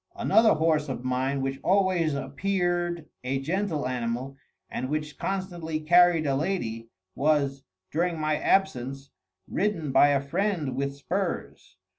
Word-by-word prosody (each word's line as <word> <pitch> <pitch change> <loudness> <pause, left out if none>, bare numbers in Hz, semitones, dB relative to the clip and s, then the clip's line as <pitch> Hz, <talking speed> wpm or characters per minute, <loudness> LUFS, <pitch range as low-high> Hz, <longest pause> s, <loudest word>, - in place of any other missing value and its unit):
Another 220 -3 +4
horse 155 -2 +1
of 125 -1 -5
mine, 130 +2 0
which 135 0 -2
always 185 -5 +2
appeared 175 +3 -1 0.2
a 135 +2 -1
gentle 160 -1 -1
animal, 125 +2 -3 0.3
and 130 - -4
which 150 0 -3
constantly 175 -5 -3
carried 175 0 +5
a 135 -1 +1
lady, 120 -9 -2 0.2
was, 140 -2 +1 0.3
during 170 +1 0
my 155 0 +1
absence, 135 -7 0 0.4
ridden 185 -8 -1
by 135 +2 +6
a 140 -1 +3
friend 150 -1 -1
with 140 +1 -2
spurs. 140 - -4
150 Hz, 130 wpm, -27 LUFS, 135-175 Hz, 0.4 s, by